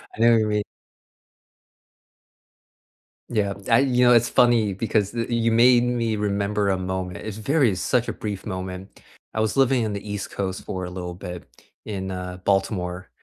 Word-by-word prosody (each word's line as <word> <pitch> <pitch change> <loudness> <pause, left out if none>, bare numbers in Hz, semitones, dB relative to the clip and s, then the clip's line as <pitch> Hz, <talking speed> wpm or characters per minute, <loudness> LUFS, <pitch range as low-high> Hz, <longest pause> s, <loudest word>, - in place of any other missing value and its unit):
I - - -14
know 120 +1 +6
what 115 - +5
you 110 - +1
mean. 105 -1 0 2.7
Yeah. 105 -4 0 0.2
I 115 0 +6
you 125 -2 +3
know, 125 - +7
it's 120 0 +4
funny 115 -5 +3
because 105 0 0
th 115 -1 -3
you 115 -1 +1
made 120 +1 +5
me 120 -2 0
remember 100 0 0
a 95 - +1
moment. 90 -1 -4
It's 110 -1 -5
very 130 -2 +2
such 120 +6 0
a - - -2
brief 105 -3 -5
moment. 95 +1 -6 0.3
I 110 - 0
was 110 +4 -1
living 130 -3 +3
on 105 - -2
the 100 - -5
East 100 -1 -4
Coast 95 -2 -4
for 95 -1 -4
a - - -6
little 90 -1 -6
bit 90 -1 -8 0.4
in, 95 -3 -4
uh, 90 0 -5
Baltimore, 95 -2 -1
105 Hz, 175 wpm, -23 LUFS, 95-115 Hz, 2.7 s, know